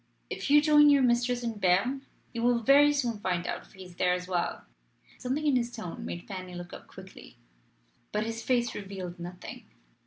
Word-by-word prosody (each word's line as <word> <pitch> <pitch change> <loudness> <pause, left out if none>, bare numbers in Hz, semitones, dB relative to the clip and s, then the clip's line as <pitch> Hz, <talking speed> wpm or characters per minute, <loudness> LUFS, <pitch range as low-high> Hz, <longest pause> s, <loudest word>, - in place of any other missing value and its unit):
If - - -4
you 295 +1 +6
join 295 -1 +6
your 280 -2 +5
mistress 245 0 +1
in 230 -3 -3
Berne, 200 +9 +1 0.3
you 230 - -3
will 240 -1 +2
very 285 +4 +6
soon 245 -7 -1
find 180 -3 -1
out - - -3
if - - -23
he 190 - -11
is 180 -1 -15
there 180 0 +2
as 180 0 -6
well." 180 -2 -2 0.5
Something 275 +5 -2
in 290 -3 +3
his 240 -1 0
tone 220 -8 -7
made 175 - -6
Fanny 185 -2 -7
look 175 0 -8
up - - -11
quickly. - - -13 0.7
But 210 +1 -1
his 225 0 -4
face 240 0 +1
revealed 190 -3 -7
nothing. 175 +1 -8
225 Hz, 195 wpm, -29 LUFS, 180-255 Hz, 0.7 s, you